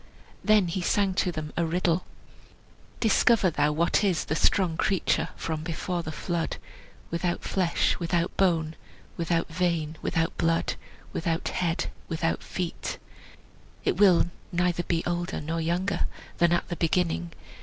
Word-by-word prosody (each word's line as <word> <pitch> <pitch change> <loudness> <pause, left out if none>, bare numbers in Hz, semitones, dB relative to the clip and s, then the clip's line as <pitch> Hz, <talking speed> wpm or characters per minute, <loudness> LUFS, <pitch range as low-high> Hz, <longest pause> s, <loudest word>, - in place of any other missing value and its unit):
Then 215 -4 +5
he 180 +2 -2
sang 195 +2 +2
to 185 -1 +1
them 155 -2 -5
a 170 - +1
riddle: 170 +1 +1 0.9
"Discover 220 -3 +4
thou 150 0 +2
what 170 +6 +2
is 185 -6 +1
The 155 - -1
strong 175 -1 +3
creature 190 +3 +1
from 160 -1 -3
before 170 +2 -2
the 160 - -5
flood, 170 +2 -2 0.5
Without 175 +1 -1
flesh, 180 -3 +1
without 170 0 0
bone, 165 -4 +2 0.4
Without 170 0 0
vein, 165 -2 -1
without 165 0 0
blood, 165 0 +2 0.4
Without 165 0 -1
head, 170 -1 -1 0.2
without 165 0 -1
feet; 180 -3 -4 0.9
It - - +1
will 180 -4 +5 0.2
neither 175 -1 +1
be 170 -1 -1
older 175 +1 -2
nor 165 +2 -2
younger 175 +5 0 0.3
Than 170 0 +4
at 175 - +1
the 175 - -3
beginning. 165 - 0
170 Hz, 140 wpm, -27 LUFS, 165-180 Hz, 0.9 s, Then